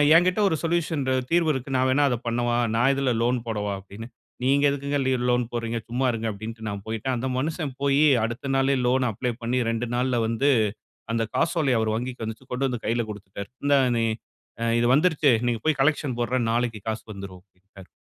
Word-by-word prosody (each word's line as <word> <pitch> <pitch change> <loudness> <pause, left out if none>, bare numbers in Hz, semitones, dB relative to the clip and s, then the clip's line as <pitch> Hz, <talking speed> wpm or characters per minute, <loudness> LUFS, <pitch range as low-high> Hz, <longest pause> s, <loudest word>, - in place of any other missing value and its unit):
"ஏன்கிட்ட 180 +4 +4
ஒரு 160 - +1
சொல்யூஷன் 165 -3 0 0.3
தீர்வு 170 -2 +3
இருக்கு, 130 0 -4
நான் 130 0 +2
வேணா 145 +2 +3
அத 125 - 0
பண்ணவா? 120 0 0 0.2
நான் 120 +4 +4
இதுல 135 -2 +1
லோன் 125 +1 +1
போடவா?" 105 -2 -2
அப்படின்னு. 100 +4 -10 0.4
"நீங்க 140 +2 +3
எதுக்குங்க 140 +1 -2
லீ 130 - +2 0.2
லோன் 125 0 +2
போடுறீங்க? 115 -1 -2
சும்மா 125 +2 0
இருங்க" 115 0 -2
அப்டின்ட்டு 110 +2 -7
நான் 100 -1 -5
போயிட்டேன். 115 +4 -2
அந்த 130 +2 -2
மனுஷன் 155 0 -2
போயி 140 +2 +4 0.2
அடுத்த 120 +4 -3
நாளே 135 +1 +2
லோன் 130 +1 +2
வந்துருச்சு - - -4
அப்ளை 125 +4 -2
பண்ணி 125 +2 0
2 115 +1 -2
நாள்ல 125 0 +1
வந்து, 115 +6 +2 0.6
அந்த 115 -1 +1
காசோலைய 150 -7 +2
அவர் 110 -1 0
வங்கிக்கு 125 0 -4
வந்துச்சு 110 +4 -7
கொண்டு 130 +2 0
வந்து 125 -3 -5
கைல 115 +1 0
குடுத்துட்டாரு. 100 -1 -8 0.2
"இந்தாங் 140 -3 +4
நீ 115 - +2 0.6
அ - - 0 0.2
இது - - +2
வந்துருச்சு. 155 -2 +3 0.2
நீங்க 120 -2 0
போயி 155 -1 +3
கலெக்க்ஷன் 145 -3 +1
போட்ற 125 +2 0
நாளைக்கு 115 -2 -1
காசு 110 0 -3
வந்துரும்" 95 -2 -9
அப்டின்ட்டாரு 95 0 -18
125 Hz, 195 wpm, -25 LUFS, 115-140 Hz, 0.6 s, ஏன்கிட்ட